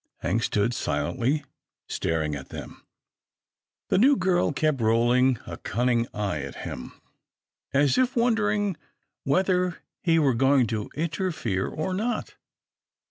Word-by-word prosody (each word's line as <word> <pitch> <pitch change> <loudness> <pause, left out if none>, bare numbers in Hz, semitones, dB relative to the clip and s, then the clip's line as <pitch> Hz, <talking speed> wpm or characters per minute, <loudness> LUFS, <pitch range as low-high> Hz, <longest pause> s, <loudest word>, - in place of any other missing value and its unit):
Hank 105 +7 0
stood 105 +1 +1
silently 120 - -1 0.4
staring 80 -2 -1
at 70 -2 -7
them. - - -9 1.1
The - - +3
new 275 +6 +6
girl 185 - +2
kept 150 -3 0
rolling 120 +3 +3
a - - -7
cunning 120 +1 0
eye 100 -6 -2
at 70 -1 -7
him, 65 - -7 0.7
as 140 - +3
if 255 +1 +2
won 240 0 +3
dering 205 -4 0 0.5
whether 180 +3 +1 0.2
he 165 -3 +3
were 145 -5 +3
going 135 +1 +4
to 105 -1 -3
interfere 155 - -1
or 170 +4 -3
not. 225 +6 -2
135 Hz, 130 wpm, -26 LUFS, 115-185 Hz, 1.1 s, new